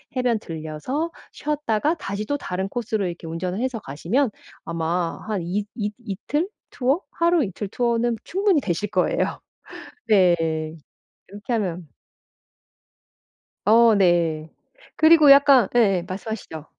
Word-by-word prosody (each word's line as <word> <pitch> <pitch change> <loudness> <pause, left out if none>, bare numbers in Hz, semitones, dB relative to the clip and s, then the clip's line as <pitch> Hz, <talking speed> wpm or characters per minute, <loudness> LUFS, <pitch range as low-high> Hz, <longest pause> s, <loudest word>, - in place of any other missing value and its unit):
해변 250 -3 +1
들러서 165 - -4 0.2
쉬었다가 295 0 -1
다시 205 -7 -5
또 285 +4 -1
다른 190 -6 -3
코스로 220 -5 -2
이렇게 170 -1 -7
운전을 180 +4 -4
해서 255 -3 -2
가시면 195 - -1 0.3
아마 165 +1 -2
한 205 -4 -2
이 195 +5 -2
이 210 -3 -2
이틀 295 - -2 0.2
투어? 275 +8 0
하루이틀 305 - 0
투어는 235 +1 0
충분히 385 -5 +1
되실 200 +1 -2
거예요. 185 -4 0 0.7
네. 185 -5 +5 0.9
이렇게 205 +4 -5
하면 180 -7 -2 1.8
어 225 +1 +6
네. 170 -4 +2 0.5
그리고 315 -2 +6
약간 275 -5 +7
예예. 195 -7 +3
말씀하시죠. 185 -5 -6
210 Hz, 255 characters per minute, -23 LUFS, 180-255 Hz, 1.8 s, 약간